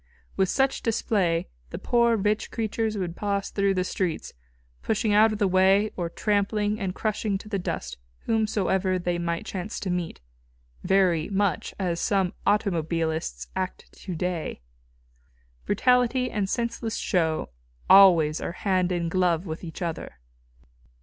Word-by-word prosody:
With 190 Hz, -1 st, +1 dB
such 270 Hz, 0 st, +1 dB
display 195 Hz, -7 st, 0 dB, 0.2 s
the -, -, -6 dB
poor 235 Hz, -1 st, +2 dB
rich 210 Hz, +1 st, 0 dB
creatures 220 Hz, -1 st, -2 dB
would 175 Hz, -3 st, -3 dB
pass 200 Hz, -1 st, -2 dB
through 200 Hz, -1 st, +1 dB
the 185 Hz, -, +1 dB
streets, 180 Hz, -3 st, -3 dB, 0.5 s
pushing 215 Hz, -1 st, 0 dB
out 215 Hz, +2 st, +6 dB
of 215 Hz, -, -3 dB
the 205 Hz, -2 st, +2 dB
way 190 Hz, +3 st, +3 dB
or 175 Hz, -2 st, -3 dB
trampling 210 Hz, +2 st, 0 dB
and 190 Hz, -3 st, -3 dB
crushing 215 Hz, -2 st, -1 dB
to 210 Hz, -, -12 dB
the 200 Hz, -2 st, -2 dB
dust 175 Hz, -, -4 dB, 0.3 s
whomsoever 195 Hz, -4 st, +1 dB
they 175 Hz, -1 st, -2 dB
might 170 Hz, +4 st, -2 dB
chance 195 Hz, 0 st, -5 dB
to 190 Hz, -, -2 dB
meet 175 Hz, -2 st, -3 dB, 0.6 s
very 180 Hz, -5 st, +2 dB
much 200 Hz, -4 st, -1 dB
as 175 Hz, -3 st, -1 dB
some 190 Hz, -2 st, +1 dB
automobilists 165 Hz, -5 st, 0 dB
act 185 Hz, -1 st, -4 dB
to 185 Hz, -3 st, -7 dB
day. 170 Hz, -, -3 dB, 1.1 s
Brutality 250 Hz, +3 st, +2 dB
and 200 Hz, -3 st, -1 dB
senseless 235 Hz, -1 st, -2 dB
show 160 Hz, -3 st, 0 dB, 0.4 s
always 170 Hz, -6 st, +6 dB
are -, -, -4 dB
hand 185 Hz, -2 st, 0 dB
in 175 Hz, -1 st, -1 dB
glove 175 Hz, 0 st, +1 dB
with 160 Hz, 0 st, -6 dB
each 170 Hz, +2 st, -6 dB
other. 165 Hz, -, -5 dB
195 Hz, 145 wpm, -26 LUFS, 175-210 Hz, 1.1 s, out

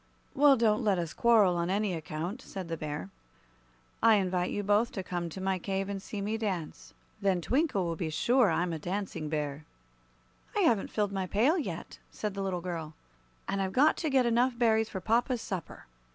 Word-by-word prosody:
"Well, 280 Hz, -1 st, +6 dB
don't 220 Hz, -2 st, +2 dB
let 200 Hz, -3 st, +2 dB
us 170 Hz, -2 st, -3 dB
quarrel, 220 Hz, -6 st, +4 dB
on 170 Hz, +1 st, -1 dB
any 200 Hz, 0 st, 0 dB
account," 165 Hz, +8 st, -4 dB
said 190 Hz, -8 st, -7 dB
the 165 Hz, -, -1 dB
Bear. 150 Hz, -, -5 dB, 0.9 s
"I 225 Hz, -1 st, +6 dB
invite 185 Hz, -2 st, 0 dB
you 205 Hz, -, -2 dB
both 205 Hz, +4 st, +2 dB
to 190 Hz, -, -4 dB
come 175 Hz, -2 st, -3 dB
to 180 Hz, -, -8 dB
my 190 Hz, 0 st, -1 dB
cave 195 Hz, +2 st, -2 dB
and 195 Hz, -1 st, -4 dB
see 205 Hz, 0 st, -6 dB
me 215 Hz, +3 st, -2 dB
dance. 165 Hz, -, -4 dB, 0.3 s
Then 195 Hz, -2 st, +2 dB
Twinkle 255 Hz, -, +1 dB
will 170 Hz, -1 st, -2 dB
be 160 Hz, 0 st, -3 dB
sure 235 Hz, -, +3 dB
I'm 170 Hz, +1 st, 0 dB
a 160 Hz, -, -4 dB
Dancing 180 Hz, -3 st, -4 dB
Bear." 150 Hz, -1 st, -3 dB, 0.9 s
"I -, -, +3 dB
haven't 235 Hz, -, +2 dB
filled 205 Hz, -2 st, -1 dB
my 190 Hz, -1 st, -2 dB
pail 235 Hz, -, +3 dB
yet," 325 Hz, -, -5 dB
said 210 Hz, -2 st, -4 dB
the 195 Hz, -, -4 dB
little 185 Hz, -2 st, -2 dB
girl, 165 Hz, -3 st, -5 dB, 0.5 s
"and 195 Hz, -, -1 dB
I've 190 Hz, 0 st, -2 dB
got 290 Hz, +4 st, +5 dB
to 320 Hz, -, -1 dB
get 265 Hz, -2 st, +3 dB
enough 240 Hz, +1 st, +2 dB
berries 225 Hz, -2 st, +3 dB
for 190 Hz, -, -5 dB
papa's 235 Hz, +4 st, +1 dB
supper." 185 Hz, -6 st, -6 dB
195 Hz, 195 wpm, -30 LUFS, 175-225 Hz, 0.9 s, Well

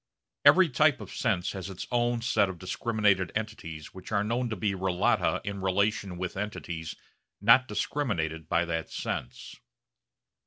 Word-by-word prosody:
Every 190 Hz, -1 st, +7 dB
type 145 Hz, -1 st, +3 dB
of 105 Hz, -, -9 dB
sense 90 Hz, -, 0 dB
has 95 Hz, -1 st, -6 dB
its 95 Hz, -, -6 dB
own 120 Hz, -1 st, +1 dB
set 100 Hz, -5 st, +2 dB
of 95 Hz, -, -6 dB
discriminated 100 Hz, 0 st, +1 dB
entities 85 Hz, -9 st, -5 dB
which 95 Hz, +2 st, -10 dB
are 100 Hz, -1 st, +2 dB
known 120 Hz, +3 st, -1 dB
to 110 Hz, -, -2 dB
be 100 Hz, +1 st, 0 dB
relata 95 Hz, -1 st, +1 dB
in 100 Hz, -1 st, -4 dB
relation 100 Hz, 0 st, 0 dB
with 90 Hz, -1 st, -4 dB
entities 90 Hz, -5 st, -5 dB, 0.4 s
not 115 Hz, +5 st, +6 dB
discriminated 85 Hz, -, -2 dB
by 85 Hz, +1 st, +2 dB
that 80 Hz, -1 st, -3 dB
sense. 60 Hz, -, -5 dB
100 Hz, 150 wpm, -28 LUFS, 90-110 Hz, 0.4 s, Every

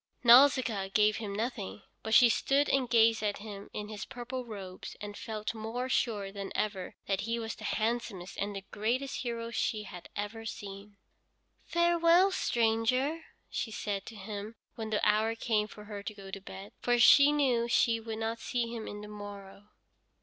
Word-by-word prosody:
Nausicaa 240 Hz, -5 st, +6 dB
gave 210 Hz, +1 st, +3 dB
him 205 Hz, -3 st, -5 dB
nothing, 210 Hz, -, -4 dB, 0.2 s
but 220 Hz, 0 st, +1 dB
she 245 Hz, -, +9 dB
stood 275 Hz, +5 st, +2 dB
and 260 Hz, -3 st, +2 dB
gazed 225 Hz, -2 st, +5 dB
at 205 Hz, -1 st, -1 dB
him 205 Hz, -1 st, -9 dB
in 210 Hz, 0 st, -5 dB
his 215 Hz, -1 st, -6 dB
purple 255 Hz, 0 st, -6 dB
robes 190 Hz, -4 st, -8 dB
and 205 Hz, -1 st, -7 dB
felt 215 Hz, 0 st, -4 dB
more 225 Hz, +3 st, -4 dB
sure 205 Hz, -6 st, 0 dB
than 195 Hz, -1 st, -6 dB
ever 200 Hz, -4 st, -2 dB
that 195 Hz, -1 st, 0 dB
he 230 Hz, +2 st, -1 dB
was 225 Hz, -1 st, -4 dB
the -, -, -10 dB
handsomest 220 Hz, -5 st, -2 dB
and 200 Hz, 0 st, -2 dB
the 195 Hz, 0 st, -6 dB
greatest 245 Hz, +6 st, -1 dB
hero 235 Hz, -2 st, -4 dB
she 215 Hz, -2 st, -1 dB
had 180 Hz, -3 st, -10 dB
ever 205 Hz, +2 st, -4 dB
seen. 200 Hz, -1 st, -8 dB, 0.7 s
"Farewell, 340 Hz, +2 st, +4 dB
stranger," 250 Hz, +3 st, +1 dB, 0.2 s
she -, -, -3 dB
said 205 Hz, -2 st, -4 dB
to 225 Hz, -, -8 dB
him 210 Hz, +2 st, -6 dB, 0.2 s
when 220 Hz, -1 st, -5 dB
the 210 Hz, -1 st, +1 dB
hour 215 Hz, +2 st, +2 dB
came 215 Hz, -2 st, 0 dB
for 210 Hz, 0 st, -12 dB
her 205 Hz, -1 st, -7 dB
to 210 Hz, +1 st, -6 dB
go 195 Hz, -1 st, -10 dB
to 195 Hz, -, -6 dB
bed, 195 Hz, +1 st, -9 dB
for 245 Hz, 0 st, +2 dB
she 280 Hz, +5 st, +8 dB
knew 255 Hz, -5 st, +2 dB
she 230 Hz, -1 st, +3 dB
would 225 Hz, -1 st, -6 dB
not 225 Hz, +1 st, -2 dB
see 235 Hz, 0 st, -2 dB
him 225 Hz, -2 st, -5 dB
on 205 Hz, -, -7 dB
the 210 Hz, -, -8 dB
morrow. 205 Hz, -1 st, -10 dB
220 Hz, 180 wpm, -31 LUFS, 205-240 Hz, 0.7 s, she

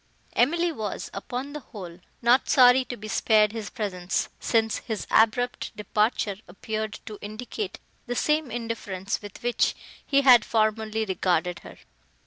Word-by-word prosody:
Emily 335 Hz, +7 st, +2 dB
was, 215 Hz, -9 st, -5 dB
upon 250 Hz, +7 st, -5 dB
the 300 Hz, -, -5 dB
whole, 185 Hz, -9 st, -10 dB, 0.2 s
not 245 Hz, +3 st, +4 dB
sorry 255 Hz, 0 st, +7 dB
to 245 Hz, -1 st, -6 dB
be 215 Hz, -, -8 dB
spared 215 Hz, 0 st, +3 dB
his 220 Hz, -3 st, -5 dB
presence, 185 Hz, -5 st, -2 dB
since 225 Hz, -1 st, +1 dB
his 220 Hz, -3 st, -5 dB
abrupt 230 Hz, +2 st, +2 dB
departure 210 Hz, 0 st, 0 dB
appeared 215 Hz, +4 st, -4 dB
to 210 Hz, -2 st, -8 dB
indicate 245 Hz, -, -5 dB, 0.3 s
the 245 Hz, -, -2 dB
same 300 Hz, +1 st, +1 dB
indifference, 220 Hz, -5 st, -4 dB
with 205 Hz, +1 st, -11 dB
which 240 Hz, 0 st, +1 dB, 0.3 s
he 280 Hz, -1 st, +3 dB
had 250 Hz, -4 st, +7 dB
formerly 220 Hz, 0 st, 0 dB
regarded 180 Hz, -2 st, 0 dB
her. -, -, -12 dB
220 Hz, 140 wpm, -26 LUFS, 205-245 Hz, 0.3 s, sorry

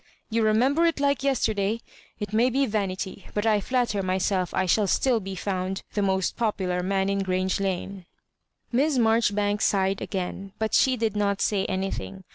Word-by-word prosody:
" -, -, -43 dB
You 230 Hz, +1 st, +1 dB
remember 255 Hz, +10 st, +3 dB
it 330 Hz, -, 0 dB
like 280 Hz, -1 st, +1 dB
yesterday 220 Hz, -7 st, +1 dB
1 230 Hz, -, -6 dB, 0.4 s
It 210 Hz, 0 st, -4 dB
may 235 Hz, +4 st, +4 dB
be 270 Hz, +2 st, +1 dB
vanity, 195 Hz, -3 st, -3 dB
but 210 Hz, +1 st, 0 dB
I 215 Hz, -2 st, +3 dB
flatter 240 Hz, -3 st, 0 dB
myself 185 Hz, -1 st, 0 dB
I 190 Hz, -, 0 dB
shall 200 Hz, +3 st, +2 dB
still 245 Hz, +4 st, +2 dB
be 195 Hz, -1 st, -6 dB
found 190 Hz, 0 st, -3 dB
the 205 Hz, -, 0 dB
most 190 Hz, -1 st, 0 dB
popular 190 Hz, -6 st, -1 dB
man 190 Hz, +1 st, 0 dB
in 200 Hz, 0 st, 0 dB
GTrange 185 Hz, 0 st, 0 dB
Lane." 190 Hz, -1 st, -3 dB, 0.6 s
Miss 275 Hz, +3 st, +2 dB
Marjoribanks 210 Hz, -3 st, +2 dB
sighed 195 Hz, -1 st, +1 dB
again, 195 Hz, 0 st, -4 dB
but 220 Hz, 0 st, -2 dB
she 260 Hz, -1 st, +4 dB
did 220 Hz, -2 st, -1 dB
not 200 Hz, -1 st, 0 dB
say 200 Hz, -2 st, +1 dB
anything. 190 Hz, 0 st, -4 dB
200 Hz, 180 wpm, -26 LUFS, 190-225 Hz, 0.6 s, may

